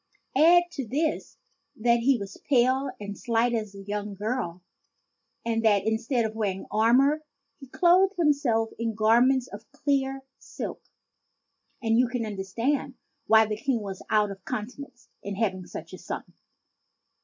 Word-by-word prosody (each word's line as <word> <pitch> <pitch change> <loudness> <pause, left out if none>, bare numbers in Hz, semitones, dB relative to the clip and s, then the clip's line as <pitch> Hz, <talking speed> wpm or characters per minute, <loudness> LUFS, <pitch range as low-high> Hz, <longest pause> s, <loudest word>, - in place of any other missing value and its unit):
Add 340 +5 +6
to 270 -7 -5
this 305 +7 -2 0.4
that 235 +1 +2
he 260 +2 +3
was 200 -2 -8
pale 260 +1 +3
and 205 -1 -6
slight 235 +1 +1
as 215 -3 -3
a 195 - -9
young 205 0 -4
girl, 200 -5 -3 0.8
and 225 -1 0
that 205 -3 +3
in 220 0 +1
stead 240 0 0
of 220 - -3
wearing 200 -4 -2
armor 255 +8 +4 0.4
he 270 - -11
clothed 370 +7 +4
himself 280 -9 +2
in 230 -1 -2
garments 240 +4 +4
of 210 +5 -11
clear 270 -2 -1 0.2
silk, - - -7 1.0
and 225 0 +3
you 250 - +4
can 245 -2 -3
understand 230 +7 -2 0.3
why 220 0 +6
the 215 0 -3
King 235 0 -1
was 195 -2 -6
out 210 -2 +2
of 195 -1 -10
countenance 250 +3 -7
in 200 0 -5
having 190 -4 -2
such - - -9
a - - -8
son. - - -5
230 Hz, 155 wpm, -26 LUFS, 210-270 Hz, 1.0 s, Add